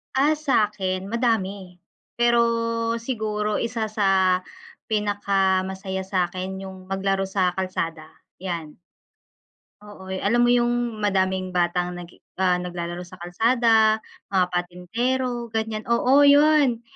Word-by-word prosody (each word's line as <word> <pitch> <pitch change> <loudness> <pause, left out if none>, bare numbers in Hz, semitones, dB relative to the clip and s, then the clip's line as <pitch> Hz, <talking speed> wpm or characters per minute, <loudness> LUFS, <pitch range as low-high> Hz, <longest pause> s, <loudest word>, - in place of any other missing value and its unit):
Ah, 295 +3 +3
sa'kin 205 -9 0
madami, 200 -6 -2 0.3
pero 235 0 +3 0.6
siguro 215 -3 -2
isa 225 -2 -2
sa 195 -3 +3 0.5
pinakamasaya 190 -2 -1
sa'kin 185 0 -2
'yung 190 -1 -9
maglaro 195 0 -1
sa 190 -1 +1
kalsada 165 -4 -4 0.2
'yan. 170 -4 -5 1.0
Oo, 205 -2 -12 0.2
alam 240 +4 +3
mo - - +3
'yung 240 -2 0
madaming 190 -2 0
batang 180 0 -1
nag 175 -1 -9 0.3
ah, 185 -1 +2
naglalaro 175 0 -5
sa 180 +1 -13
kalsada, 220 +4 +3 0.3
mga 190 -2 +3
patintero 235 +8 -2
ganiyan, 220 -1 -3
oo 255 +4 +4
'yun, 285 -4 +5
195 Hz, 105 wpm, -23 LUFS, 185-230 Hz, 1.0 s, yun